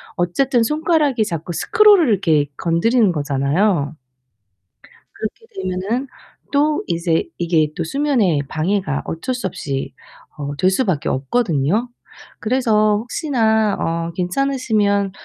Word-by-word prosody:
어쨌든 235 - +1
손가락이 300 -3 +1
자꾸 170 -2 -4
스크롤을 415 - +4
이렇게 165 -8 +2
건드리는 200 +6 +2
거잖아요. 145 +3 0 1.2
그렇게 220 - -6
되면은 225 - -2 0.4
또 295 +1 +2
이제 170 -1 0
이게 165 -3 +2
또 170 - -2
수면에 235 - +1
방해가 160 -1 -1
어쩔 250 +11 -3
수 245 - -2
없이 140 -6 -4 0.4
어 145 -1 -5
될 185 +4 +3
수밖에 190 - 0
없거든요. 165 - 0 0.5
그래서 215 -3 +2
혹시나 220 - +1
어 165 0 -2
괜찮으시면 205 -1 0
200 Hz, 270 characters per minute, -19 LUFS, 165-250 Hz, 1.2 s, 스크롤을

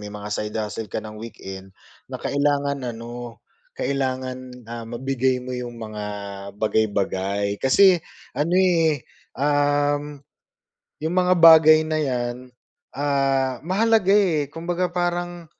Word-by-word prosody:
may 105 0 -8
mga 105 0 -7
side 105 +1 -3
hustle 105 0 -4
ka - - -2
ng 110 - -8
weekend, 95 -4 -9 0.4
na - - -4
kailangan 140 -1 0 0.2
ano, 120 0 -8 0.4
kailangan, 130 -2 -3
ah, 115 0 -6
mabigay 130 +1 0
mo 130 - -5
yung 120 -1 -6
mga 110 -2 -6 0.5
bagay-bagay. 100 -2 0
Kasi 180 +7 +5 0.3
ano, 165 +4 0
eh, 165 -7 +2 0.3
um, 145 0 +1 0.8
yung 160 +3 -2
mga 185 0 +3
bagay 160 -1 +8
na 155 0 -1
'yan, 120 -3 -2 0.6
ah, 135 -2 0
mahalaga, 200 +2 +2
eh, 160 -8 +2
kumbaga 175 +3 -2
parang 175 -1 -2
135 Hz, 120 wpm, -23 LUFS, 115-160 Hz, 0.8 s, bagay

